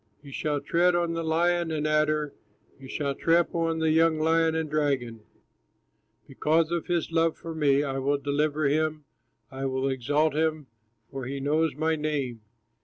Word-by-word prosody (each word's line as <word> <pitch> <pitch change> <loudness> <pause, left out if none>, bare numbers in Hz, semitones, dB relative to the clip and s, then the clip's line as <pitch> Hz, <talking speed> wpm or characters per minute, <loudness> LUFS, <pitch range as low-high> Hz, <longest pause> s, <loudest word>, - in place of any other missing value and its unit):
You 140 - -11
shall 145 +1 -1
tread 175 +5 +2
on 170 -1 0
the 165 - -2
lion 170 +1 +1
and 155 -1 -2
adder, 155 -1 +1 0.5
You 135 - -11
shall 140 +1 -2
trample 170 +3 +1
on 165 0 -1
the 160 -1 +1
young 160 0 +3
lion 160 +1 +2
and 160 -1 -1
dragon. 140 -6 -1 1.1
"Because 160 +1 +1
of 170 -1 -2
his 170 -2 -1
love 165 0 +1
for 165 - -7
me 145 -3 +2
I 135 -2 -2
will 140 +2 +1
deliver 145 +2 0
him, 155 +1 0 0.5
I 135 0 -3
will 130 0 -1
exalt 145 +4 +1
him, 155 -1 0 0.5
for 135 -2 -5
he 135 +2 -4
knows 150 +2 +1
my 160 +2 0
name. 145 -7 -3
155 Hz, 170 wpm, -27 LUFS, 140-160 Hz, 1.1 s, young